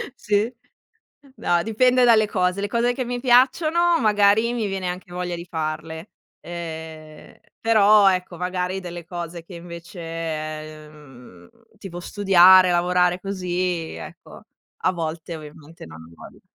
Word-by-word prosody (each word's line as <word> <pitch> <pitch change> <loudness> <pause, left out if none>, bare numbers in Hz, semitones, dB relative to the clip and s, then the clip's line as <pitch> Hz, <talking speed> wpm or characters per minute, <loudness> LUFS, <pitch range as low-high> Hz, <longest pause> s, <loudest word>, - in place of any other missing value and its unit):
sì? 210 +1 0 0.8
No, 175 -8 0
dipende 250 +3 +3
dalle 220 -3 +5
cose, 185 -1 -1
le 205 - -1
cose 235 +3 0
che 255 0 -4
mi 245 0 -4
piacciono, 310 +7 +3
magari 215 +1 +3
mi 235 -3 -2
viene 190 -2 -3
anche 180 0 -6
voglia 180 -1 -3
di 170 0 -8
farle, 160 +1 -5 0.3
ehm, 160 -2 -9 0.2
però 210 -2 +5
ecco, 180 -2 -4
magari 180 +1 -3
delle 175 -2 -8
cose 170 -1 -7
che 175 - -14
invece, 165 -3 -7
mhmm, 125 - -16 0.3
tipo 185 -3 -8
studiare, 185 -1 +5
lavorare 180 +1 +2
così, 180 -3 -3
ecco, - - -12 0.3
a - - 0
volte 165 0 -5
ovviamente 155 +1 -13
non 80 0 -12
ho 80 - -16
voglia. - - -14
180 Hz, 135 wpm, -22 LUFS, 165-205 Hz, 0.8 s, dalle